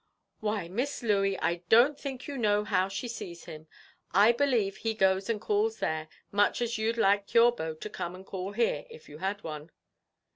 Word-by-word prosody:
"Why, 210 -4 -2
Miss 245 +9 -3
Louey, 195 -3 +2
I 170 +1 +1
don't 245 +6 +6
think 270 -3 -6
you 285 - -5
know 210 -4 +2
how 190 -3 +1
she 195 +5 -4
sees 175 -7 -7
him. 155 -1 -10 0.5
I 205 +4 +7
believe 235 -7 +1
he 225 +1 -2
goes 190 0 +2
and 225 -2 0
calls 425 - 0
there, 160 0 -2 0.2
much 205 0 +2
as 235 -2 -1
you'd 225 +2 0
like 200 -2 +2
your 235 +1 +7
beau 160 -9 -5
to 155 - -7
come 180 -4 -5
and 190 +1 -12
call 190 +1 -5
here, 220 -9 0
if 155 - -13
you 150 +1 -11
had 200 +3 -3
one." 155 0 -7
205 Hz, 195 wpm, -29 LUFS, 185-235 Hz, 0.5 s, I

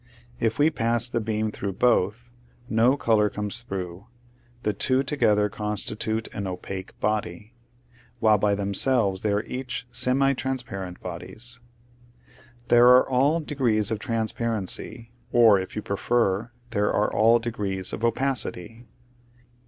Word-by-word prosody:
If 115 0 0
we 150 +2 +3
pass 115 -3 +1
the 120 -1 -2
beam 110 0 -2
through 100 -1 -5
both, 120 +2 +1 0.4
no 120 +5 +3
color 110 -5 +2
comes 105 +3 -3
through; 95 -2 -6 0.6
the 105 - 0
two 130 +4 +1
together 105 -8 +2
constitute 105 +2 -3
an 100 -2 -4
opaque 95 +1 -7
body, 110 +1 -3 0.7
while 110 -2 +4
by 100 0 +2
themselves 100 0 +2
they 105 - 0
are 105 +1 0
each 125 -1 -5
semi 135 +2 +2
transparent 120 -9 -5
bodies. 120 +2 -7 1.1
There 120 0 +6
are 125 +1 +6
all 140 +6 +2
de 150 - -6
grees 110 -7 +1
of 110 - -2
transparency, 115 0 -1 0.2
or, 115 -4 +6
if 95 - -7
you 105 - -4
prefer, 105 +1 0 0.2
there 105 -2 +1
are 105 - 0
all 115 +2 +5
degrees 100 -5 -1
of 110 - -5
opacity. 115 -2 -1
110 Hz, 135 wpm, -25 LUFS, 105-120 Hz, 1.1 s, There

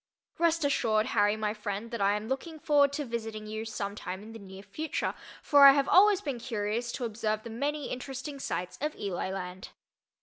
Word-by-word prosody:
Rest 335 -2 +2
assured, 220 -6 +2
Harry 205 -1 +3
my 210 -1 -1
friend, 210 +1 -5
that 235 -3 -3
I 200 +1 +3
am 210 +1 -4
looking 270 +6 -4
forward 290 -2 +3
to 295 0 -2
visiting 225 -3 -5
you 220 +1 -5
some 200 -3 -4
time 190 -1 -6
in 220 - -10
the 225 - -9
near 195 -1 -11
future, 315 +8 -3 0.3
for 285 -2 +8
I 275 - +10
have 280 0 +1
always 400 +1 +6
been 275 -5 -3
curious 230 0 -2
to 250 - -3
observe 215 -1 -2
the 230 - -7
many 285 +5 -2
interesting 270 +3 -5
sights 180 -8 -4
of 300 +1 -2
"Eli 190 -2 -3
land." 185 0 -6
225 Hz, 200 wpm, -29 LUFS, 210-280 Hz, 0.3 s, I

